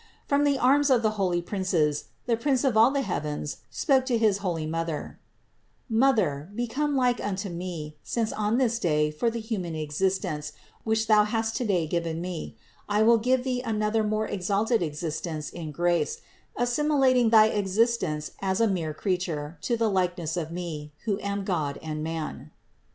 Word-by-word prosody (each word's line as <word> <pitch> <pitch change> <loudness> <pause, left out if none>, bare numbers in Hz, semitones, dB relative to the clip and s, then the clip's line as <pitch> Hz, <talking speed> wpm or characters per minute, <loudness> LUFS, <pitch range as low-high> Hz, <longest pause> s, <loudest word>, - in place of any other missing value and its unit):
From 285 +1 +2
the 285 -1 +3
arms 280 +3 +4
of 245 -3 +4
the 215 - +3
holy 185 -5 0
princes 170 -6 0 0.2
the 235 - +2
Prince 260 +2 +1
of 265 -5 +2
all 225 +3 +7
the 275 0 0
heavens 150 - -3
spoke 270 -4 +2
to 245 -3 +2
his 215 -3 +2
holy 175 -5 -2
Mother: 165 -1 -4 0.7
"Mother, 215 - +2
become 265 +5 -1
like 250 -2 +2
unto 200 0 -2
Me, 170 -4 -6
since 230 -2 -1
on 215 +2 0
this 235 -3 +1
day, 150 -5 +1
for 190 +10 0
the 230 +1 -4
human 200 -7 -3
existence, 155 -1 -2 0.3
which 220 0 +1
thou 215 -1 +5
hast 225 +1 -1
today 195 -9 +1
given 165 0 -2
Me, 175 -1 -5 0.3
I 210 +1 +3
will 230 +1 +5
give 250 +2 +2
thee 250 -1 -1
another 215 -1 0
more 215 +1 0
exalted 205 +4 0
existence 155 0 -3
in 165 -3 -6
grace, 175 - 0 0.3
assimilating 255 -1 +3
thy 220 -1 +7
existence 195 -6 0
as 190 +1 0
a 230 - +4
mere 165 -6 -2
creature 170 -4 -2
to 235 - 0
the 225 0 +2
likeness 180 -4 0
of 165 -2 -3
Me, 165 -4 -5
who 205 -3 0
am 200 0 -3
God 155 -7 -1
and 155 -1 -5
Man." 160 -1 -5
200 Hz, 165 wpm, -27 LUFS, 165-230 Hz, 0.7 s, all